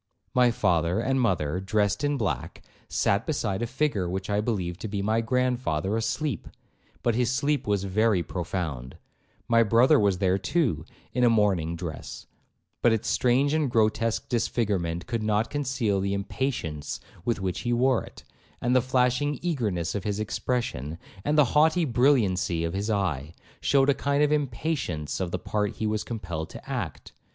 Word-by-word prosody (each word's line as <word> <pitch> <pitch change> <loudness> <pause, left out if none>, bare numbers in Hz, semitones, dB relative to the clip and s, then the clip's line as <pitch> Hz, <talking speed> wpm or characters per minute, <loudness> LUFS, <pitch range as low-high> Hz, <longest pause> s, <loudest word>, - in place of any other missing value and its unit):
My 125 -1 +5
father 90 -6 +1
and 130 +3 +1
mother, 90 -7 +1
dressed 105 +2 0
in 145 0 +1
black, 105 -7 -3 0.3
sat 100 +3 +1
beside 110 -10 -1
a 120 - -1
figure 125 -8 0
which 95 +2 -3
I 105 0 +2
believed 95 -6 -2
to - - -3
be 100 -1 -3
my 110 +2 +2
grandfather 120 -6 0
asleep, 115 - -2 0.6
but 120 - +2
his 120 0 +1
sleep 140 0 0
was 100 -2 +1
very 100 -1 +2
profound; 80 -8 -4 0.5
my 115 -1 +5
brother 120 +7 +5
was 100 -3 +2
there 95 0 +2
too, 100 - 0 0.3
in 125 - +1
a 120 - +6
mourning 95 -7 +2
dress, 85 -2 -7 0.6
but 120 - +5
its 110 -2 0
strange 130 +4 +2
and 155 -3 +1
grotesque 115 0 +1
disfigurement 100 -8 -1
could 115 -2 -2
not 110 +1 0
conceal 130 -8 0
the 100 +1 -1
impatience 100 - -3 0.2
with 115 0 0
which 95 -1 -2
he 120 - -2
wore 125 +1 +3
it, - - -13 0.4
and 125 +1 +1
the 130 - +5
flashing 130 +3 +1
eagerness 105 - -1
of 100 - -3
his 105 0 -2
expression, 110 - -2 0.3
and 150 +1 +1
the 150 - +7
haughty 160 +3 +4
brilliancy 115 - +2
of 85 0 -2
his 100 +3 -2
eye, 85 -8 -1 0.2
shewed 135 -1 +3
a - - +6
kind 140 +2 +1
of 150 - +2
impatience 135 - -1
of 95 -2 -1
the - - -2
part 105 -1 -2
he 110 - -3
was 105 0 0
compelled 85 -8 -5
to - - -11
act. - - -5
110 Hz, 170 wpm, -26 LUFS, 95-125 Hz, 0.6 s, the